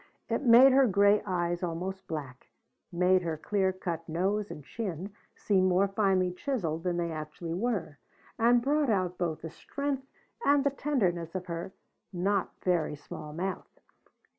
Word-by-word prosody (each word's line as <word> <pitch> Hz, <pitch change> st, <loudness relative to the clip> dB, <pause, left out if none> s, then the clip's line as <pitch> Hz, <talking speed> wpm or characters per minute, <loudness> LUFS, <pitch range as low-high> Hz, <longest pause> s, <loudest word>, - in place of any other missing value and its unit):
It -, -, 0 dB
made 255 Hz, +1 st, +8 dB
her 265 Hz, 0 st, +5 dB
gray 200 Hz, +1 st, +4 dB
eyes 175 Hz, -2 st, -1 dB
almost 180 Hz, +2 st, -4 dB
black; 140 Hz, -5 st, -6 dB, 0.4 s
made 180 Hz, +1 st, +3 dB
her 165 Hz, -3 st, -3 dB
clear 190 Hz, +3 st, 0 dB
cut 170 Hz, -3 st, -5 dB
nose 195 Hz, +5 st, 0 dB
and 150 Hz, -, -8 dB
chin 195 Hz, -3 st, -5 dB, 0.2 s
seem 190 Hz, -3 st, +2 dB
more 185 Hz, +2 st, +3 dB
finely 195 Hz, -2 st, +1 dB
chiseled 180 Hz, -, -2 dB
than 180 Hz, -1 st, -1 dB
they 170 Hz, -1 st, -1 dB
actually 155 Hz, +2 st, -5 dB
were, 185 Hz, -7 st, -2 dB, 0.4 s
and 235 Hz, +1 st, +4 dB
brought 290 Hz, 0 st, +2 dB
out 185 Hz, -4 st, 0 dB
both 165 Hz, -4 st, -2 dB
the 160 Hz, -, -6 dB
strength 280 Hz, -, -4 dB, 0.4 s
and 285 Hz, -1 st, +4 dB
the 280 Hz, -, +2 dB
tenderness 190 Hz, -, -1 dB
of 185 Hz, -1 st, -3 dB
her 170 Hz, +1 st, -5 dB, 0.4 s
not 195 Hz, +1 st, 0 dB
very 170 Hz, -5 st, +1 dB
small 150 Hz, +1 st, -9 dB
mouth. 185 Hz, +5 st, -5 dB
185 Hz, 155 wpm, -29 LUFS, 170-210 Hz, 0.4 s, made